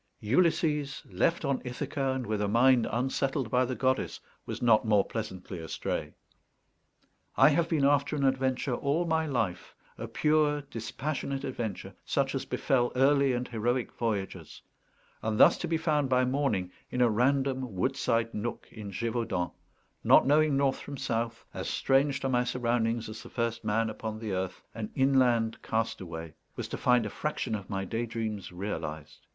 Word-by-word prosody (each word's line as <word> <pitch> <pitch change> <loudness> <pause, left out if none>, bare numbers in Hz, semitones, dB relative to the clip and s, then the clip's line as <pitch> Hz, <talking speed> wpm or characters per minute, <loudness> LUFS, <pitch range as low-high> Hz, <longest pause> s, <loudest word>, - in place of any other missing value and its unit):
Ulysses, 150 +2 +1
left 165 0 +1
on 135 -2 0
Ithaca, 135 +2 -2
and 130 -2 -3
with 110 -2 -1
a 105 - +1
mind 120 +3 +4
unsettled 135 +1 -1
by 125 0 +3
the 130 +1 -3
goddess, 130 +1 0 0.3
was - - -4
not 115 -3 +4
more 105 -3 +3
pleasantly 95 -5 -5
astray. 80 -1 -4 1.2
I - - +8
have 165 +3 +1
been 150 -4 +2
after 140 +1 +2
an 140 -2 +1
adventure 130 0 +1
all 145 +7 0
my 160 -1 +1
life, 95 -10 -2 0.2
a - - -4
pure 150 -1 +2
dispassionate 135 +3 -4
adventure, 120 -6 -4
such - - 0
as - - -2
befell 120 -3 +1
early 140 0 +4
and 125 0 -2
heroic 120 +2 -1
voyagers; 105 -5 -4 0.6
and 110 -1 -1
thus 165 - +8
to 175 - -3
be 165 0 +1
found 150 -4 +1
by 130 0 +3
morning 125 -9 0 0.2
in 125 - -1
a 120 - +6
random 130 0 +1
woodside 115 +1 0
nook 115 +3 -4
in 105 -3 -8
Gévaudan 115 -3 -2 0.5
not - - +6
knowing 150 0 +4
north 140 -1 +1
from 140 -1 -7
south, 115 -3 -2
as - - -4
strange 135 +1 +2
to - - 0
my 125 -2 +2
surroundings 115 -2 0
as 110 0 -8
the - - -11
first 115 -1 -2
man 110 +1 +1
upon 110 0 -5
the 110 -2 -5
earth, 95 0 -3
an 110 -1 -5
inland 125 -4 +3
castaway 85 -8 -3 0.2
was - - -4
to - - -3
find 125 -2 +3
a - - -2
fraction 150 -6 -3
of 100 -3 -4
my 95 -2 -2
daydreams 110 -2 -3
realized. 80 -5 -6
125 Hz, 165 wpm, -29 LUFS, 110-135 Hz, 1.2 s, I